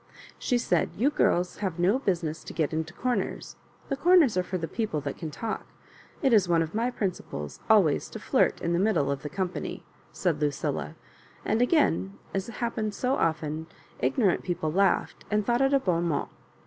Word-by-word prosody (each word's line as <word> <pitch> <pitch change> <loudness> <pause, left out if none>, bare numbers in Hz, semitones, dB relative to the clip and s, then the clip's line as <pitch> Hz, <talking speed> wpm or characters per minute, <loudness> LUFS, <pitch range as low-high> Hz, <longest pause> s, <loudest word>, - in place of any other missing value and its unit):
She 245 - +1
said, 240 - +1
"You 265 +8 +3
giris 180 -9 +1
have 190 -5 -2
no 190 +8 +3
busi 185 -9 0
ness 155 0 -4
to - - -7
get 160 -2 0
into 160 +1 -2
comers. 245 +6 -2 0.3
The 275 - 0
comers 320 - +5
are 185 - +3
for 185 +1 -3
the 165 -2 -3
people 210 -4 -2
that 140 - -4
can 160 - -5
talk. 220 +8 -4 0.6
It 265 -3 +4
is 195 -5 +4
one 165 -1 +4
of 160 - -7
my 230 +3 +1
principles 185 - -4
always 195 -10 +4
to - - -7
flirt - - +2
in 170 - 0
the 170 - +2
middle 185 -9 +2
of 140 -1 -3
the 150 - -5
company," 185 +1 -4 0.3
said 165 -5 -1
Lucilla; 80 - -1 0.5
and 220 +3 +1
again, 100 - +2 0.2
as 195 -1 -2
happened 225 -2 -3
so 255 +1 0
often, 160 - -1 0.3
ignorant 135 - +2
people 170 -4 -2
laughed 195 +4 +1
and 210 -1 +1
thought 240 +1 +2
it 270 0 +3
a 275 - +4
bon 175 -8 0
mot. 155 -4 -1
180 Hz, 190 wpm, -27 LUFS, 160-230 Hz, 0.6 s, comers